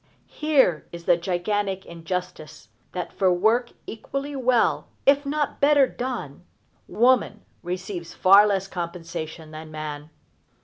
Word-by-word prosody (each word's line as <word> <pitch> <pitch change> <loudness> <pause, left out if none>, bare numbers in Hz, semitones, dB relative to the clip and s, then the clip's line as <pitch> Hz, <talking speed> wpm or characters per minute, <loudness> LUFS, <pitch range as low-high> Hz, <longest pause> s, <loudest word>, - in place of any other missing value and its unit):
Here 280 - +2
is 170 0 -9
the 175 - +5
gigantic 190 +3 -2
injustice 170 - -6 0.2
that 180 -1 -5
for 190 -2 +2
work 220 +7 +2
equally 275 +6 -5
well, 255 -3 +2 0.2
if 280 +1 +4
not 295 0 -2
better 285 -1 +6
done, 245 - -5 0.4
woman 240 -3 +2 0.2
receives 180 -1 -5
far 200 +3 +7
less 195 -2 0
compensation 165 -3 -6
than 155 0 -9
man. 155 -1 -6
185 Hz, 120 wpm, -24 LUFS, 170-245 Hz, 0.4 s, far